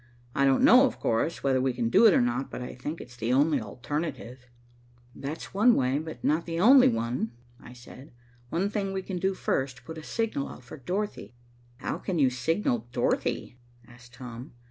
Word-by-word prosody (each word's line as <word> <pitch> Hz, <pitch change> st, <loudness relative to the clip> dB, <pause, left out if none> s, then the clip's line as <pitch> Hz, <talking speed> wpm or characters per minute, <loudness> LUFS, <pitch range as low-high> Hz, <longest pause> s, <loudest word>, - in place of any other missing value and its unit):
I 140 Hz, -, +2 dB
don't 135 Hz, -1 st, +3 dB
know, 255 Hz, +3 st, +7 dB
of -, -, -7 dB
course, 115 Hz, +9 st, -1 dB
whether 130 Hz, -2 st, +2 dB
we 130 Hz, -1 st, +1 dB
can 120 Hz, -1 st, -1 dB
do 230 Hz, -, +7 dB
it 205 Hz, -, +6 dB
or -, -, +4 dB
not, 120 Hz, +2 st, -1 dB
but -, -, -6 dB
I 125 Hz, -, -6 dB
think 150 Hz, +6 st, -6 dB
it's 125 Hz, 0 st, -11 dB
the 115 Hz, 0 st, -2 dB
only 140 Hz, +1 st, +3 dB
alternative." 130 Hz, +2 st, -5 dB, 0.7 s
"That's 145 Hz, +4 st, -7 dB
one 230 Hz, +5 st, +5 dB
way, 130 Hz, +2 st, +1 dB
but 160 Hz, 0 st, -8 dB
not 160 Hz, +3 st, +1 dB
the 165 Hz, 0 st, -3 dB
only 255 Hz, +7 st, +7 dB
one," 115 Hz, 0 st, -1 dB, 0.3 s
I 120 Hz, -, -13 dB
said. 125 Hz, +3 st, -13 dB, 0.4 s
"One 175 Hz, +7 st, 0 dB
thing 195 Hz, -3 st, -2 dB
we 190 Hz, 0 st, -3 dB
can 185 Hz, -2 st, -4 dB
do 190 Hz, +1 st, 0 dB
first, 130 Hz, -6 st, -2 dB
put 160 Hz, 0 st, -7 dB
a -, -, -11 dB
signal 220 Hz, -8 st, -2 dB
out -, -, -11 dB
for 120 Hz, -, -10 dB
Dorothy." 180 Hz, -1 st, -4 dB, 0.4 s
"How 130 Hz, -, -4 dB
can 185 Hz, -3 st, -3 dB
you 135 Hz, -4 st, +3 dB
signal 130 Hz, -, -1 dB
Dorothy?" 125 Hz, 0 st, -1 dB, 0.3 s
asked 120 Hz, 0 st, -16 dB
Tom. 125 Hz, 0 st, -9 dB
135 Hz, 195 wpm, -27 LUFS, 125-170 Hz, 0.7 s, know